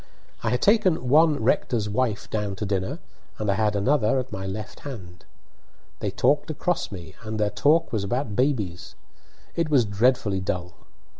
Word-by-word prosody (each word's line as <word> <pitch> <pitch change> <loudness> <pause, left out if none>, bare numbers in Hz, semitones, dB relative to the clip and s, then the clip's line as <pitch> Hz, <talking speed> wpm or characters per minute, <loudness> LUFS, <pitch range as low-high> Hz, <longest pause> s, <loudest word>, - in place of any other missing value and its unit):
I 115 - 0
had 125 +1 0
taken 190 - +3
one 150 -2 +4
rector's 110 -2 +1
wife 110 0 -1
down 105 -2 -2
to 105 - -4
dinner, 95 -2 -1 0.4
and 105 -2 0
I - - +2
had 105 +1 +1
another 110 +3 +2
at 130 0 -3
my 95 0 -4
left 105 +2 -6
hand. 95 -11 -9 0.7
They - - -1
talked - - +1
across - - -1
me, 85 -4 -8
and 110 -1 -5
their 105 -1 +1
talk 155 +9 +2
was 105 -3 0
about 115 +1 -2
babies; 110 -10 -1 0.6
it 165 -2 0
was 135 -6 +4
dreadfully 105 -1 +2
dull. 90 -2 -3
110 Hz, 165 wpm, -25 LUFS, 100-130 Hz, 0.7 s, one